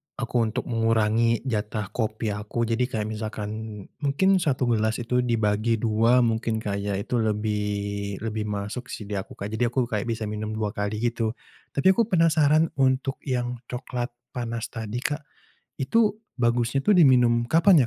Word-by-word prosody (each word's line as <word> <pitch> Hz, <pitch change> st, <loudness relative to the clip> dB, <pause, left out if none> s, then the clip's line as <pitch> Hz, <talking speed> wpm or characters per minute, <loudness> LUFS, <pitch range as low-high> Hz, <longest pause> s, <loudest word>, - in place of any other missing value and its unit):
aku -, -, -5 dB
untuk 110 Hz, -, -2 dB
mengurangi 115 Hz, 0 st, +2 dB
jatah 105 Hz, -4 st, -2 dB
kopi 110 Hz, -1 st, -2 dB
aku. 105 Hz, +3 st, -2 dB
Jadi 115 Hz, +2 st, +1 dB
kayak 110 Hz, -4 st, -2 dB
misalkan, 110 Hz, 0 st, -5 dB, 0.2 s
mungkin 185 Hz, +7 st, +3 dB
1 140 Hz, -6 st, 0 dB
gelas 110 Hz, 0 st, +1 dB
itu 125 Hz, +2 st, +1 dB
dibagi 115 Hz, -2 st, +1 dB
2 115 Hz, +3 st, +3 dB
mungkin, 115 Hz, 0 st, 0 dB
Kak 100 Hz, -1 st, -2 dB
ya? 100 Hz, 0 st, -2 dB
Itu 100 Hz, +5 st, -1 dB
lebih 105 Hz, -2 st, -1 dB
lebih 110 Hz, -1 st, -2 dB
masuk 105 Hz, +4 st, -4 dB
sih -, -, -6 dB
di 105 Hz, -, -10 dB
aku, 95 Hz, -, -9 dB
Kak. 100 Hz, +1 st, -6 dB
Jadi 120 Hz, +2 st, +1 dB
aku 125 Hz, +2 st, +1 dB
kayak 110 Hz, -2 st, -2 dB
bisa 115 Hz, -1 st, -2 dB
minum 105 Hz, 0 st, -3 dB
2 105 Hz, -1 st, -1 dB
kali 105 Hz, +1 st, -3 dB
gitu. 115 Hz, -1 st, 0 dB, 0.4 s
Tapi 185 Hz, +7 st, +5 dB
aku 225 Hz, +3 st, +2 dB
penasaran 160 Hz, -4 st, +4 dB
untuk 130 Hz, 0 st, +1 dB
yang 125 Hz, -2 st, -1 dB
coklat 125 Hz, -1 st, -4 dB, 0.2 s
panas 115 Hz, -2 st, -4 dB
tadi, 115 Hz, +2 st, -4 dB
Kak, 145 Hz, 0 st, -3 dB, 0.5 s
itu 210 Hz, +10 st, +2 dB, 0.2 s
bagusnya 120 Hz, +2 st, +2 dB
tuh 210 Hz, -, +4 dB
diminum 125 Hz, -7 st, +5 dB
kapan 165 Hz, +4 st, +5 dB
115 Hz, 160 wpm, -25 LUFS, 105-125 Hz, 0.5 s, Tapi